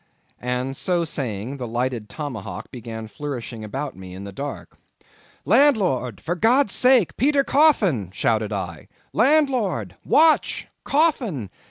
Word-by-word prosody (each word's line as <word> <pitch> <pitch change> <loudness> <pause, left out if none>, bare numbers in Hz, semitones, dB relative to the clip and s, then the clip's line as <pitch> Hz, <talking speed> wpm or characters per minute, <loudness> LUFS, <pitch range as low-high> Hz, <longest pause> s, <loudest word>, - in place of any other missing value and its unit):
And 125 +2 -2
so 175 +3 0
saying 125 -4 -4
the 125 -2 -5
lighted 120 -1 -2
tomahawk 125 - -6
began 115 -2 -7
flourishing 120 -1 -6
about 135 +6 -5
me 95 -1 -10
in 95 - -8
the 100 - -7
dark. 140 +7 -7 0.7
"Landlord, 195 - +3
for 170 - -2
God's 225 - +3
sake, 250 -7 +4
Peter 280 +2 +3
Coffin!" 210 - +3
shouted 110 +2 0
I. 90 -6 -5 0.3
"Landlord! 230 - +2
Watch! 315 0 +3 0.2
Coffin! 245 - +1
135 Hz, 125 wpm, -23 LUFS, -, 0.7 s, sake